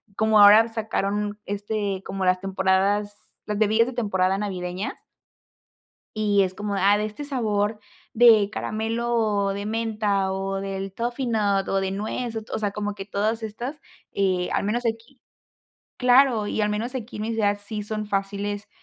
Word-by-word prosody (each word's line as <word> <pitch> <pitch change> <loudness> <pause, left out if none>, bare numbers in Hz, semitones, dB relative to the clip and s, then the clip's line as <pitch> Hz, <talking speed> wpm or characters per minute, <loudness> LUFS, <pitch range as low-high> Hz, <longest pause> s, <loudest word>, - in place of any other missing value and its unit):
como 220 0 +3
ahora 210 +2 +8
sacaron, 210 -2 -2
este, 205 -1 -3
como 195 0 -3
las 185 0 +3
temporadas 195 +2 +1 0.3
las 210 -1 -3
bebidas 220 +2 +4
de 255 - -5
temporada 195 -5 +1
navideñas 185 -1 -4 1.2
y 205 -2 +3
es 185 -1 -2
como, 205 +1 -3
ah, 200 +2 +4
de 210 - -1
este 215 +7 -6
sabor 215 -6 -1 0.3
de 220 -3 +6
caramelo 220 -2 -1
de 200 +1 -5
menta 215 -3 0
o 195 0 -2
del 195 0 -4
toffee 240 +4 -3
nut 205 -4 +1
o 195 - +1
de 190 0 -2
nuez, 220 +4 -3
o 220 - -3
to - - -11
o - - -2
sea, 205 -2 -1
como 205 0 -3
que 195 -1 -7
todas 215 +3 -1
estas, 240 +7 -5 0.3
eh 185 -2 0
al - - 0
menos 235 +4 -1
aquí 230 +3 -4 0.8
claro. 250 -3 +4
Y 215 - -2
al 210 - +2
menos 220 +5 -3
aquí 245 -2 -6
en 210 - -4
mi 225 - -2
ciudad 205 -2 +1
sí 210 0 -4
son 215 0 -4
fáciles, 200 +1 -3
210 Hz, 170 wpm, -24 LUFS, 195-225 Hz, 1.2 s, ahora